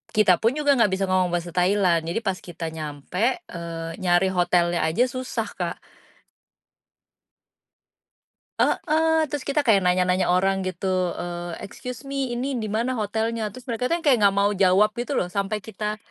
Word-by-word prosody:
kita 190 Hz, -5 st, +5 dB
pun 230 Hz, +4 st, +1 dB
juga 290 Hz, -4 st, +2 dB
nggak 210 Hz, -, +4 dB
bisa 195 Hz, -, -2 dB
ngomong 185 Hz, -1 st, +3 dB
bahasa 175 Hz, 0 st, -3 dB
Thailand. 180 Hz, -2 st, +2 dB
Jadi 170 Hz, -, -1 dB
pas 190 Hz, -3 st, -1 dB
kita 165 Hz, -2 st, -6 dB
nyampe, 160 Hz, -, -2 dB
eee, 165 Hz, -1 st, -6 dB
nyari 185 Hz, +1 st, +2 dB
hotelnya 175 Hz, -1 st, +2 dB
aja 185 Hz, +10 st, +2 dB
susah, 255 Hz, 0 st, -3 dB
Kak. -, -, -2 dB, 2.8 s
Heeh, 320 Hz, 0 st, +2 dB
terus 290 Hz, -3 st, -4 dB
kita 290 Hz, +1 st, +1 dB
kayak 220 Hz, -7 st, +4 dB
nanya-nanya 180 Hz, +1 st, +2 dB
orang 195 Hz, +1 st, +1 dB
gitu, 185 Hz, -1 st, -1 dB
eee, 175 Hz, -1 st, -5 dB
"Excuse 245 Hz, +4 st, -8 dB
me, 275 Hz, -3 st, -2 dB
ini 260 Hz, +1 st, -2 dB
di 220 Hz, -, -3 dB
mana 230 Hz, +5 st, -1 dB
hotelnya?" 220 Hz, +1 st, -1 dB
terus 255 Hz, +1 st, -12 dB
mereka 235 Hz, +1 st, -1 dB
tuh -, -, +2 dB
yang -, -, -19 dB
kayak 255 Hz, -5 st, +5 dB
nggak 195 Hz, 0 st, +4 dB
mau 205 Hz, -, +3 dB
jawab 195 Hz, +2 st, +4 dB
gitu 245 Hz, +4 st, -3 dB
loh, 180 Hz, -, 0 dB
sampai 200 Hz, +2 st, -2 dB
kita 215 Hz, 0 st, -4 dB
195 Hz, 165 wpm, -24 LUFS, 180-240 Hz, 2.8 s, kita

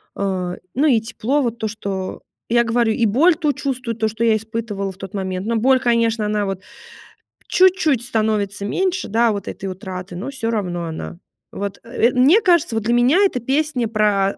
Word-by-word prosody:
А, 185 Hz, -3 st, -2 dB, 0.2 s
ну, 290 Hz, +5 st, +3 dB
и 240 Hz, -5 st, +4 dB
тепло, 230 Hz, +5 st, -1 dB
вот 235 Hz, -2 st, -2 dB
то, 220 Hz, -, -1 dB
что 195 Hz, -3 st, -5 dB, 0.3 s
я 235 Hz, 0 st, +4 dB
говорю, 230 Hz, 0 st, +2 dB
и 230 Hz, -, +1 dB
боль 305 Hz, -, +4 dB
ту 305 Hz, -4 st, 0 dB
чувствую, 255 Hz, -4 st, -3 dB
то, 220 Hz, 0 st, 0 dB
что 225 Hz, +2 st, -3 dB
я 225 Hz, -1 st, +4 dB
испытывала 215 Hz, -3 st, -4 dB
в 190 Hz, -, -16 dB
тот 195 Hz, -2 st, -9 dB
момент. 190 Hz, 0 st, -3 dB
Но 230 Hz, -, 0 dB
боль, 260 Hz, +3 st, +4 dB
конечно, 230 Hz, -2 st, +1 dB
она 210 Hz, 0 st, 0 dB
вот 195 Hz, -1 st, -4 dB, 0.9 s
чуть-чуть 360 Hz, -9 st, +3 dB
становится 215 Hz, -4 st, -1 dB
меньше, 375 Hz, -, -1 dB
да, 230 Hz, +1 st, +3 dB
вот 200 Hz, -2 st, -5 dB
этой -, -, -6 dB
утраты, 185 Hz, -1 st, -6 dB
но 210 Hz, +10 st, -5 dB
всё 230 Hz, -4 st, -3 dB
равно 180 Hz, -6 st, -2 dB
она 160 Hz, +1 st, -6 dB, 0.3 s
Вот, 200 Hz, -1 st, -5 dB
э, 235 Hz, 0 st, +1 dB
мне 290 Hz, -, +5 dB
кажется, 340 Hz, -9 st, +3 dB
вот 220 Hz, -, -1 dB
для 235 Hz, +2 st, +1 dB
меня 245 Hz, +8 st, +4 dB
эта 375 Hz, -10 st, +1 dB
песня 265 Hz, -1 st, 0 dB
про 205 Hz, -3 st, +1 dB
225 Hz, 190 wpm, -20 LUFS, 200-255 Hz, 0.9 s, мне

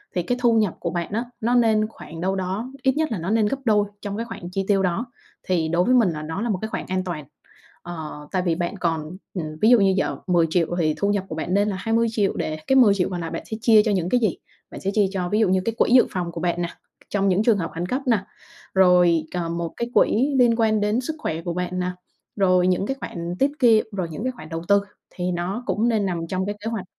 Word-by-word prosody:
thì 180 Hz, -, +1 dB
cái 245 Hz, +7 st, -1 dB
thu 235 Hz, -2 st, +4 dB
nhập 215 Hz, -5 st, +2 dB
của 170 Hz, -, -2 dB
bạn 175 Hz, 0 st, -3 dB
á, 230 Hz, +3 st, -1 dB, 0.2 s
nó 240 Hz, +2 st, +2 dB
nên 220 Hz, -3 st, +3 dB
khoảng 165 Hz, -6 st, -10 dB
đâu 190 Hz, +1 st, 0 dB
đó 190 Hz, +7 st, -3 dB
ít 265 Hz, -, +3 dB
nhất 315 Hz, -3 st, 0 dB
là 220 Hz, -, -1 dB
nó 170 Hz, +3 st, -4 dB
nên 220 Hz, 0 st, +3 dB
gấp 275 Hz, -, -1 dB
đôi 210 Hz, -2 st, +3 dB
trong 205 Hz, 0 st, -4 dB
cái 230 Hz, -, -3 dB
khoản 200 Hz, -7 st, -8 dB
chi 195 Hz, 0 st, -2 dB
tiêu 195 Hz, -2 st, +3 dB
đó. 185 Hz, +7 st, 0 dB, 0.4 s
Thì 170 Hz, -4 st, 0 dB
đối 170 Hz, +2 st, +2 dB
với 255 Hz, -, +3 dB
mình 230 Hz, -6 st, +4 dB
là 155 Hz, -2 st, -4 dB
nó 160 Hz, +5 st, -4 dB
là 235 Hz, -, -1 dB
một 190 Hz, -, 0 dB
cái 220 Hz, -, -3 dB
khoảng -, -, -4 dB
an 185 Hz, 0 st, -1 dB
toàn. 170 Hz, -5 st, -5 dB, 0.6 s
Ờ, 155 Hz, -3 st, -7 dB
tại 185 Hz, -, +1 dB
vì 175 Hz, -2 st, 0 dB
bạn 175 Hz, +4 st, -3 dB
còn 165 Hz, -1 st, -2 dB, 0.2 s
mình 155 Hz, -4 st, -5 dB
ví 220 Hz, -, +5 dB
dụ 245 Hz, -, +7 dB
như 195 Hz, -1 st, +4 dB
giờ -, -, 0 dB
10.000.000 170 Hz, -1 st, +2 dB
thì 155 Hz, -2 st, +2 dB
thu 200 Hz, -, 0 dB
nhập 205 Hz, -2 st, +1 dB
của 155 Hz, -, -4 dB
bạn 170 Hz, +3 st, -3 dB
nên 205 Hz, +1 st, +3 dB
là 195 Hz, -, -2 dB
20.000.000 225 Hz, -1 st, +1 dB
để 155 Hz, 0 st, -2 dB
cái 265 Hz, -, +3 dB
10.000.000 200 Hz, -8 st, +5 dB
còn 180 Hz, -2 st, -4 dB
lại 165 Hz, -, -5 dB
bạn -, -, -5 dB
sẽ 220 Hz, -, -2 dB
chia 220 Hz, -2 st, +6 dB
cho 215 Hz, -, +2 dB
những 180 Hz, -3 st, 0 dB
cái 250 Hz, -, +3 dB
gì? 215 Hz, -6 st, +1 dB, 0.3 s
Bạn -, -, -8 dB
sẽ 195 Hz, -, -1 dB
chia 210 Hz, -1 st, +3 dB
cho, 180 Hz, -2 st, -2 dB
ví 210 Hz, -, +1 dB
dụ 215 Hz, -4 st, +3 dB
như, 185 Hz, 0 st, +2 dB
cái 230 Hz, -, -1 dB
quỹ -, -, +2 dB
dự 255 Hz, -, +7 dB
phòng 175 Hz, -2 st, -3 dB
của 165 Hz, -, -6 dB
bạn 175 Hz, -1 st, 0 dB
nè, 170 Hz, -, -2 dB, 0.4 s
trong 200 Hz, -1 st, +1 dB
những 195 Hz, +2 st, +2 dB
trường 220 Hz, -3 st, +4 dB
hợp 165 Hz, -3 st, -3 dB
khẩn 170 Hz, -, -2 dB
cấp 255 Hz, +9 st, -2 dB
nè, 230 Hz, -4 st, +4 dB, 0.5 s
rồi, 180 Hz, -3 st, +5 dB
ờ, 175 Hz, -2 st, -2 dB
một 170 Hz, -1 st, -3 dB
cái 235 Hz, -, -2 dB
quỹ 270 Hz, +6 st, +3 dB
liên 240 Hz, -2 st, +5 dB
quan 220 Hz, -2 st, +2 dB
đến 210 Hz, +4 st, +1 dB
sức 310 Hz, +5 st, -4 dB
khỏe 160 Hz, -, -3 dB
của 170 Hz, 0 st, -3 dB
bạn 180 Hz, +1 st, -3 dB
nè, 180 Hz, 0 st, -1 dB, 0.4 s
rồi 185 Hz, -2 st, +3 dB
những 185 Hz, +1 st, +1 dB
cái 270 Hz, -, -2 dB
khoản 170 Hz, -5 st, -5 dB
tiết 275 Hz, +1 st, +3 dB
kiệm, 230 Hz, -4 st, +5 dB
rồi 185 Hz, -4 st, -3 dB
những 180 Hz, -, -6 dB
cái 255 Hz, -, 0 dB
khoản 195 Hz, -11 st, -12 dB
đầu 165 Hz, 0 st, -4 dB
tư 200 Hz, 0 st, +5 dB, 0.3 s
thì 180 Hz, 0 st, -3 dB
nó 180 Hz, +7 st, -3 dB
cũng 230 Hz, -2 st, +1 dB
nên 215 Hz, -3 st, +1 dB
nằm 170 Hz, -3 st, -2 dB
trong 185 Hz, +2 st, -2 dB
cái 205 Hz, +1 st, -3 dB
kế -, -, 0 dB
hoạch. 210 Hz, -5 st, -4 dB
190 Hz, 275 wpm, -23 LUFS, 175-220 Hz, 0.6 s, dụ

